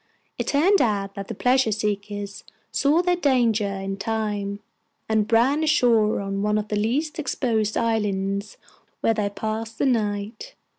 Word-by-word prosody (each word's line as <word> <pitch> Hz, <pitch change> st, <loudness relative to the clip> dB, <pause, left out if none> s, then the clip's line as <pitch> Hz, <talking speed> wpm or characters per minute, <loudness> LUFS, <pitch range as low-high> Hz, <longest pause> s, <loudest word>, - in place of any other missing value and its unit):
It -, -, -2 dB
turned 360 Hz, +8 st, +4 dB
out 200 Hz, -3 st, 0 dB
that 200 Hz, 0 st, -6 dB
the 225 Hz, -, -5 dB
pleasure 250 Hz, +1 st, +2 dB
seekers 205 Hz, -1 st, -3 dB, 0.3 s
saw 300 Hz, +5 st, +2 dB
their 360 Hz, 0 st, +2 dB
danger 240 Hz, -, +2 dB
in 195 Hz, 0 st, -4 dB
time, 205 Hz, -1 st, -2 dB, 0.5 s
and 220 Hz, 0 st, +1 dB
ran 265 Hz, +7 st, +3 dB
ashore 235 Hz, -9 st, +3 dB
on 195 Hz, 0 st, -3 dB
one 210 Hz, +1 st, +1 dB
of 210 Hz, 0 st, -3 dB
the 210 Hz, -, -1 dB
least 275 Hz, +10 st, -1 dB
exposed 225 Hz, -7 st, 0 dB
islands, 200 Hz, -3 st, -1 dB, 0.4 s
where 225 Hz, -, +3 dB
they 210 Hz, -2 st, -1 dB
passed 220 Hz, +2 st, -4 dB
the -, -, +1 dB
night. 215 Hz, -, -1 dB
215 Hz, 150 wpm, -24 LUFS, 200-245 Hz, 0.5 s, turned